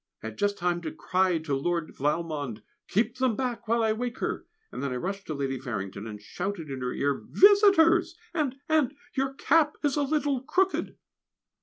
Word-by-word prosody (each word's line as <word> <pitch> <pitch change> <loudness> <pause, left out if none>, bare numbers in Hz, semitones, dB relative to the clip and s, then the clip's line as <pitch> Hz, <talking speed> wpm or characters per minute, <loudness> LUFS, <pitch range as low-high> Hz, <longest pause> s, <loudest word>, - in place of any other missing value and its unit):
I 110 - -3
had 110 - -13
just 205 0 +1
time 175 -1 0
to 160 -2 -4
cry 185 -1 +1
to 155 -3 -2
Lord 170 +3 -1
Valmond, 145 -6 -2 0.2
"Keep 235 +4 0
them 255 -3 +1
back 250 -2 -3
while 230 +1 +2
I 220 -1 +3
wake 245 +2 -4
her!" - - -3 0.2
and - - -6
then 140 - -2
I - - -2
rushed 195 +9 -4
to 155 - -3
Lady 135 -2 -2
Farrington, 100 -4 -5
and 105 -1 -7
shouted 175 - -5
in 130 -1 -5
her 125 0 -2
ear, 140 -1 -1
"Visitors! 365 -4 +5 0.2
and 295 -6 0
and 300 -3 +2 0.2
your 270 0 -1
cap 300 +1 +3
is 290 0 +1
a - - +2
little 285 -2 0
crooked!" 365 +8 0
200 Hz, 190 wpm, -27 LUFS, -, 0.2 s, Visitors